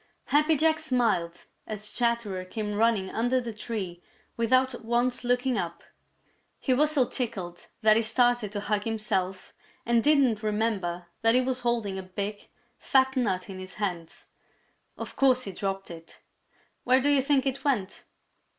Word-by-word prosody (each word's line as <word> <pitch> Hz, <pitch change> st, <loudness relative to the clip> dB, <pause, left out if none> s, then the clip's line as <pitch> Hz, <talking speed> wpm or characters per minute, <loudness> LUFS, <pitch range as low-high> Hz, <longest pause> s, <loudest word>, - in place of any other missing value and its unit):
Happy 305 Hz, +2 st, +4 dB
Jack 315 Hz, +2 st, +3 dB
smiled 230 Hz, -, 0 dB, 0.2 s
as 210 Hz, -1 st, -5 dB
Chatterer 235 Hz, -6 st, -1 dB
came 210 Hz, +2 st, -4 dB
running 210 Hz, -3 st, +1 dB
under 245 Hz, +3 st, +1 dB
the 235 Hz, -2 st, -5 dB
tree 210 Hz, -5 st, -5 dB, 0.3 s
without 255 Hz, +2 st, +1 dB
once 240 Hz, +2 st, 0 dB
looking 245 Hz, -1 st, +1 dB
up. 170 Hz, -1 st, -5 dB, 0.8 s
He 260 Hz, -, +1 dB
was 300 Hz, +4 st, +3 dB
so 285 Hz, -5 st, +3 dB
tickled 200 Hz, -10 st, -4 dB, 0.2 s
that 215 Hz, 0 st, +6 dB
he -, -, +3 dB
started 240 Hz, -1 st, +2 dB
to 205 Hz, -, -2 dB
hug 210 Hz, 0 st, -1 dB
himself 195 Hz, -4 st, -2 dB, 0.3 s
and 235 Hz, -1 st, +3 dB
didn't 270 Hz, -8 st, +4 dB
remember 210 Hz, -5 st, -1 dB, 0.2 s
that 225 Hz, +1 st, +4 dB
he 255 Hz, -, +5 dB
was 255 Hz, 0 st, -1 dB
holding 230 Hz, -6 st, -1 dB
a -, -, -4 dB
big, 200 Hz, +2 st, -5 dB, 0.3 s
fat 265 Hz, 0 st, +2 dB
nut 195 Hz, -8 st, 0 dB
in 190 Hz, -2 st, -8 dB
his 185 Hz, 0 st, -8 dB
hands. 175 Hz, -6 st, -4 dB, 0.7 s
Of -, -, -7 dB
course 255 Hz, -2 st, +4 dB
he 195 Hz, -, -5 dB
dropped 195 Hz, -1 st, -4 dB
it. 165 Hz, 0 st, -12 dB, 0.6 s
Where 255 Hz, +1 st, +4 dB
do 280 Hz, +2 st, +1 dB
you 285 Hz, -2 st, +4 dB
think 275 Hz, 0 st, +2 dB
it 270 Hz, 0 st, -2 dB
went? 225 Hz, -10 st, -1 dB
225 Hz, 160 wpm, -27 LUFS, 195-255 Hz, 0.8 s, that